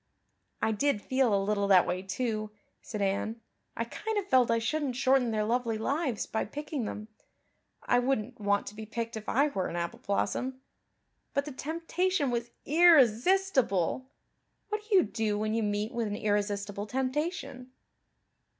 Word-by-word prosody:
"I 220 - +3
did 250 +2 +1
feel 260 +2 +1
a 200 - +4
little 200 0 0
that 190 -3 +6
way, 180 +1 -2
too," 215 +2 -2 0.3
said 210 -2 -4
Anne. 200 +4 -1 0.4
"I 230 - -1
kind 435 - -4
of 405 - 0
felt 255 -5 +4
I 230 - +3
shouldn't 260 +3 -1
shorten 260 -1 +3
their 215 -1 0
lovely 230 0 0
lives 270 +1 -1
by 220 - -2
picking 290 +1 -4
them 210 0 -6 0.8
I 245 - +3
wouldn't 245 -2 -1
want 200 0 +1
to - - -7
be 215 0 -8
picked 230 +1 -4
if 215 -1 -6
I 280 +4 +3
were 190 -9 -2
an - - -5
apple 170 0 -3
blossom. 255 +6 -1 0.8
But 280 0 +1
the 300 - -6
temptation 330 +2 -1
was 235 0 -2 0.2
irresistible. 270 - +4 0.6
What 425 0 -2
do 415 - +3
you 370 - +7
do 220 -2 -1
when 215 +1 -1
you 225 - +1
meet 210 +1 -1
with 235 -2 -1
an 205 - -3
irresistible 205 -1 -1
temptation?" 265 - -3
235 Hz, 165 wpm, -30 LUFS, 210-275 Hz, 0.8 s, you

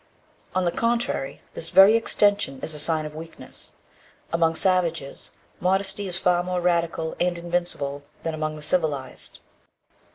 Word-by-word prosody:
On 185 -1 +2
the 175 - +2
contrary, 230 - -1
this 165 - -4
very 195 +5 +8
extension 205 -10 +2
is 160 - -2
a 150 - -4
sign 155 +1 +1
of 150 - -6
weakness. 160 +1 -8 0.6
Among 165 -1 +3
savages, 170 -6 0 0.2
modesty 195 +2 +1
is 175 -1 +1
far 180 -2 +3
more 180 0 -1
radical 170 -2 0
and 175 0 +1
invincible 170 -5 -2 0.2
than 165 - -2
among 155 0 -2
the 150 - -9
civilized. 150 -6 -1
170 Hz, 140 wpm, -25 LUFS, 155-185 Hz, 0.6 s, very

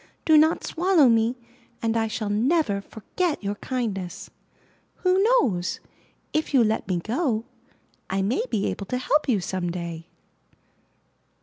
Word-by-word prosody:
Do 315 - +5
not 315 +2 +4
swallow 345 -4 +3
me 230 +1 +2 0.4
and 225 0 -1
I 225 -1 +1
shall 215 -1 -3
never 225 -1 +1
forg'et 295 - -3
your 200 0 -1
kindness. 205 -6 -4 0.7
Who 370 +1 +3
knows, 255 - +2 0.5
if 310 -1 0
you 250 - +6
let 220 0 0
me 185 -2 0
go, 230 - -1 0.6
I 190 0 0
maybe 225 - -1
able 200 - -3
to 250 - -1
help 295 +3 +1
you 220 -5 +3
some 180 -1 -3
day! 170 -2 -6
225 Hz, 135 wpm, -25 LUFS, 195-305 Hz, 0.7 s, you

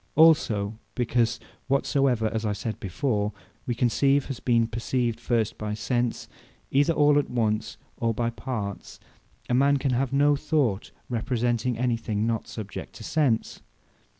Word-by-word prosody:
Also 115 -10 +4 0.2
because 120 -1 +1 0.3
whatsoever 135 -3 +2
(as 110 0 -1
I 105 -1 0
said 110 +2 -4
before,) 105 +2 -1 0.3
we 120 - 0
conceive, 135 +3 +2
has 135 - -4
been 115 -2 +2
perceived 115 +1 -1
first 115 -4 -1
by 105 -1 -3
sense, 120 +2 -1 0.4
either 145 +4 +4
all 145 -1 +4
at 145 - -2
once, 110 -2 -1 0.2
or 115 -1 +1
by 115 +1 -1
parts; 110 -5 -5 0.5
a - - -1
man 140 +3 +4
can 135 -1 0
have 125 +1 0
no 145 +1 +4
thought, 140 -9 0 0.2
representing 120 0 -1
any 120 -1 +1
thing, 110 -1 -2
not 115 -1 -1
subject 105 -4 -7
to - - -10
sense. 135 -8 0
120 Hz, 150 wpm, -26 LUFS, 110-135 Hz, 0.5 s, Also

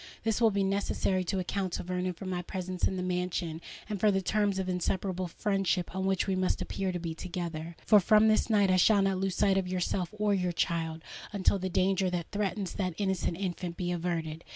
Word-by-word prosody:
This 225 +1 0
will 225 - +6
be 200 -1 0
necessary 195 -1 0
to 190 +2 -1
account 185 0 -2
to - - -2
Vernon 180 0 -2
for 175 - -9
my 180 -1 -2
presence 185 0 -2
in 190 - -3
the 180 - -2
mansion, 180 -2 -2 0.3
and 210 -2 -3
for 215 - +4
the 195 -1 +2
terms 200 +1 +1
of 190 -1 -2
inseparable 185 0 -1
friendship 190 -1 -1
on 190 0 -1
which 190 -1 +1
we 195 - 0
must 185 0 0
appear 190 -1 -2
to 180 - -3
be 165 -1 -4
together. 170 -2 -5
For 210 - +7
from 215 +3 +5
this 215 +2 +3
night 205 -3 +4
I 185 - +4
shall 200 +2 +5
not 195 -1 +1
lose 190 -1 -1
sight 195 -1 +3
of 185 - -3
yourself 180 -1 -1
or 210 -1 +2
your 180 -2 0
child, 165 -1 -1 0.3
until 200 -1 +2
the 185 0 -2
danger 190 +1 +2
that 175 -2 -3
threatens 200 -2 -2
that 185 -4 -2
innocent 190 -4 -1
infant 180 -2 -4
be 175 -1 -2
averted. 165 -2 -2
185 Hz, 220 wpm, -30 LUFS, 175-195 Hz, 0.3 s, For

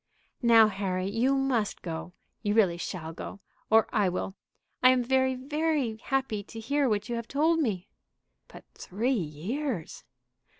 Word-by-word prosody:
"Now, 230 -3 +7
Harry, 190 -2 -2
you 235 +7 +2
must 260 -6 0
go. 165 +1 -5 0.3
You 205 -1 0
really 190 -6 +4
shall 165 -3 -5
go, 195 - -8 0.3
or 220 0 +5
I 200 -3 +3
will. 185 +1 -3 0.5
I 255 - +7
am 255 -1 +3
very, 260 +1 +2
very 285 -3 -1
happy 265 -3 -1
to 225 +3 -10
hear 280 +4 +1
what 210 -1 0
you 240 - -2
have 230 -1 -5
told 320 +4 +2
me." 205 - -1 0.6
"But - - -13
three 225 +8 -2
years!" 195 - -3
225 Hz, 155 wpm, -28 LUFS, 195-265 Hz, 0.6 s, Now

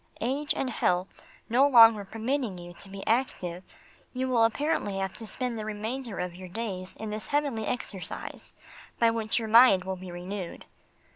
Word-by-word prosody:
Age 275 +5 -1
and 260 - -1
health 180 -4 0 0.3
no 260 +5 +4
longer 230 -5 +8
permitting 225 0 -2
you 175 0 -9
to 195 +3 -12
be 195 0 -8
active, 190 -7 -1 0.5
you 260 0 -1
will 240 -3 +4
apparently 230 -4 0
have 190 -1 -2
to 225 - -7
spend 245 0 -3
the - - -4
remainder 220 +2 -4
of 180 -1 -3
your 185 +1 -9
days 190 -2 -4
in 220 -1 -6
this 210 -2 -5
heavenly 285 -7 0
exercise 205 -6 -5 0.4
by 230 -1 +4
which 225 -1 -1
your 225 -2 -1
mind 225 -4 +7
will 190 0 -4
be 185 0 -9
renewed. 180 +1 -6
220 Hz, 170 wpm, -28 LUFS, 190-245 Hz, 0.5 s, longer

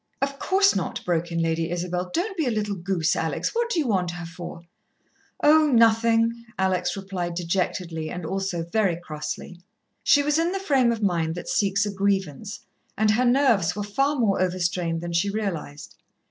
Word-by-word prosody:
"Of 275 0 -2
course 390 +1 +3
not," 190 - -3
broke 170 -1 -1
in 170 0 0
Lady 165 0 0
Isabel. 180 +1 -3
"Don't 385 - -1
be 320 -6 0
a - - +3
little 210 -3 -1
goose, 175 -3 0
Alex. 160 - -2
What 470 0 0
do 420 - -1
you 315 - +1
want 185 -5 +1
her 175 0 -6
for?" 170 0 -8 0.8
"Oh, 310 +1 +6
nothing," 230 -1 +3
Alex 185 0 0
replied 185 -3 -4
dejectedly, 170 -2 -2
and 180 -2 -6
also 190 -1 -2
very 190 0 +1
crossly. 155 +1 -6 0.4
She 285 - +5
was 295 +2 +2
in 340 +2 +1
the 390 - -2
frame 270 -10 +2
of 225 -2 -3
mind 165 -4 0
that 175 - -7
seeks 195 0 +1
a 205 - -2
grievance, 195 -4 -1 0.4
and 215 0 +3
her 245 +4 +2
nerves 240 - +3
were 205 - -3
far 275 +8 0
more 215 -8 +1
overstrained 175 -2 -1
than 170 0 -5
she 175 +4 +1
realized. 195 -8 -4
195 Hz, 180 wpm, -24 LUFS, 170-230 Hz, 0.8 s, Oh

